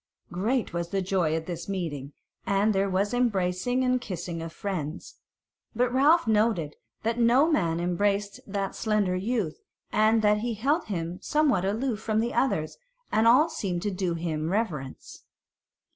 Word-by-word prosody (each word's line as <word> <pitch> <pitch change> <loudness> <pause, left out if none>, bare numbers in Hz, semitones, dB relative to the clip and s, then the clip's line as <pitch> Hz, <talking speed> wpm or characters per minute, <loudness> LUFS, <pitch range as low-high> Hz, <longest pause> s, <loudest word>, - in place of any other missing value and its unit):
Great 215 +6 -1
was 170 0 -2
the 195 - -1
joy 180 -4 +1
at 160 0 -3
this 175 +2 -6
meeting, 155 -8 -4 0.4
and 200 +2 +2
there 195 0 +1
was 195 +4 0
embracing 235 +1 +1
and 255 0 +1
kissing 175 -5 -5
of 165 0 -6
friends: 170 -4 -5 0.6
but 245 +1 +1
Ralph 295 +5 +5
noted 210 -8 +1 0.3
that 230 +2 -1
no 250 +7 +4
man 170 - +1
embraced 200 +3 0
that 195 -1 -2
slender 210 -4 0
youth, 200 -3 -2 0.3
and 220 +1 +3
that 210 0 +4
he 235 +1 -2
held 285 +10 +1
him 175 -2 -4
somewhat 280 -12 +2
aloof 220 +3 -1
from 220 -1 0
the 235 +2 -1
others, 155 -13 0 0.3
and 220 +1 +3
all 260 +7 +6
seemed 180 - -3
to 205 - -1
do 180 -2 -1
him 160 -2 -2
reverence. 170 - -3
200 Hz, 160 wpm, -27 LUFS, 175-230 Hz, 0.6 s, all